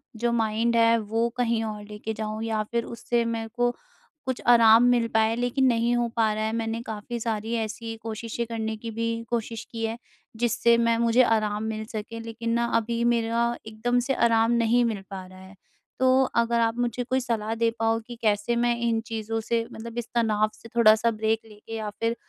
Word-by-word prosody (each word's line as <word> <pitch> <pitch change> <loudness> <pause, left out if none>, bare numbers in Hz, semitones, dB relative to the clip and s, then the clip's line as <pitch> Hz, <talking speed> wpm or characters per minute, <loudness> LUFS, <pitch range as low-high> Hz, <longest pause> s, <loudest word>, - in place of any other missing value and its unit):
जो 235 +1 0
माइंड 225 +1 +1
है, 230 0 +5
वो 225 +2 0
कहीं 235 -2 +1
और 215 -1 -5
लेके 210 +1 -6
जाऊँ 215 0 -4
या 220 -1 -1
फ़िर 235 +2 -2
उससे 235 0 -1
मेरे 230 -1 -2
को 245 0 +2 0.5
कुछ 260 -1 -3
आराम 230 -1 +7
मिल 245 -1 +3
पाए, 220 +1 +3
लेकिन 245 +2 +1
नहीं 235 0 +2
हो 240 0 +1
पा 225 -2 +3
रहा 215 0 -2
है। 220 - 0
मैंने 225 0 -2
काफ़ी 220 +2 -5
सारी 225 0 -2
ऐसी 225 +1 -6
कोशिशें 225 +1 -4
करने 220 -1 -3
की 230 +1 -6
भी 230 +1 -2
कोशिश 230 -1 -3
की 225 -1 -3
है, 225 +1 -3 0.4
जिससे 235 0 +3
मैं 230 0 +2
मुझे 235 +2 +4
आराम 215 -2 +1
मिल 220 0 -3
सके, 220 +1 -6
लेकिन 230 0 -5
ना 235 0 +2
अभी 230 +1 -1
मेरा 235 +1 0
एकदम 230 +3 0
से - - +3
आराम 230 -2 +3
नहीं 235 +1 +3
मिल 215 -4 -2
पा 190 -2 -7
रहा 185 0 -14
है। 190 +1 -14 0.4
तो 260 0 +4 0.2
अगर 235 0 +1
आप 225 0 +1
मुझे 245 0 -1
कोई 260 +2 0
सलाह 225 -3 -2
दे 230 0 +2
पाओ 225 0 +2
कि 240 - -7
कैसे 210 +1 +1
मैं 240 0 +2
इन 230 -1 +1
चीज़ों 225 -1 -3
से 230 0 0
मतलब 230 +1 -8
इस 240 -1 -3
तनाव 215 -2 +2
से 230 - -14
थोड़ा-सा 225 0 +5
ब्रेक 220 0 0
लेके 215 +1 -10
या 215 -1 -3
फ़िर 230 +3 -2
230 Hz, 200 wpm, -26 LUFS, 220-235 Hz, 0.5 s, आराम